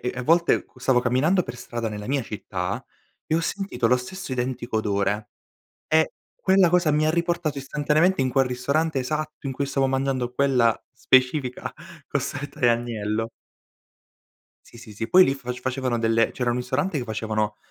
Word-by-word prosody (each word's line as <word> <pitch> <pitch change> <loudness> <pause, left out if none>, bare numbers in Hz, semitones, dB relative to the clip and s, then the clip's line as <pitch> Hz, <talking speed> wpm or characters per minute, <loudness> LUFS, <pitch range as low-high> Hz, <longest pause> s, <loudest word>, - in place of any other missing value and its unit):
e 125 - -1
a 125 - -3
volte, 170 +5 +3
qu - - -21
stavo 130 -1 +3
camminando 135 +10 +2
per 120 - -8
strada 120 -1 -4
nella 105 -1 -6
mia 135 0 0
città, 105 -3 -4 0.4
e 155 - 0
ho 165 - +3
sentito 165 - -1
lo 125 - +5
stesso 180 +6 -7
identico 125 -2 -2
odore, 105 0 -1 0.6
e 160 0 +3 0.2
quella 190 -2 +4
cosa 175 -3 +3
mi 155 +1 +2
riportato 170 -3 -1
istantaneamente 150 +4 +1
in 130 - 0
quel 135 +1 +3
ristorante 140 +4 0
esatto 150 +2 -3
in 135 - -2
cui 140 +2 -2
stavo 135 0 +1
mangiando 130 -2 -1
quella 125 -4 +2
specifica 130 +1 +2 0.4
costoletta 145 +2 -4
di 120 - +4
agnello. 115 -2 -1 1.4
Sì, 115 - -14
sì, 115 -3 -11
sì. 115 +2 -4
Poi 185 0 +8
lì 135 - +1
fac 125 -2 -6
facevano 130 -2 -1
delle 115 0 +2
c'era 125 -2 -1
un 120 - 0
ristorante 150 +8 -1
che 135 - -1
facevano 110 -1 -2
130 Hz, 170 wpm, -24 LUFS, 120-150 Hz, 1.4 s, Poi